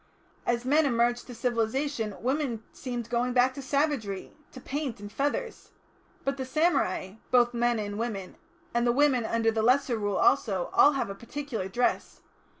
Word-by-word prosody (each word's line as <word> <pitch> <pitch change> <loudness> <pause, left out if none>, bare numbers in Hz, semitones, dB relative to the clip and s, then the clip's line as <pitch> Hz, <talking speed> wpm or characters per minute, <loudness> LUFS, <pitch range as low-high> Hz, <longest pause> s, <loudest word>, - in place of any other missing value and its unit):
As 240 0 0
men 295 +3 +4
emerged 240 -1 +1
to 245 - -8
civilisation, 235 -1 -1
women 255 -4 -1
seemed 245 -3 -5
going 245 +1 +1
back 255 +1 +4
to 275 - -7
savagery 265 -8 -1 0.2
to 255 - -10
paint 275 -3 -4
and 205 0 -8
feathers. 290 - -2 0.6
But 275 0 0
the 265 - -3
samurai, 260 - 0
both 245 -1 +4
men 240 0 +1
and 205 -1 -4
women, 205 -5 -4 0.4
and 235 +1 +2
the - - +5
women 265 -3 +3
under 225 0 +1
the 220 0 0
Lesser 250 0 +3
Rule 205 -2 -1
also, 190 -5 +2
all 295 - +6
have 265 -7 -2
a - - -4
particular 235 -1 -5
dress. 240 +6 -1
240 Hz, 165 wpm, -28 LUFS, 220-275 Hz, 0.6 s, all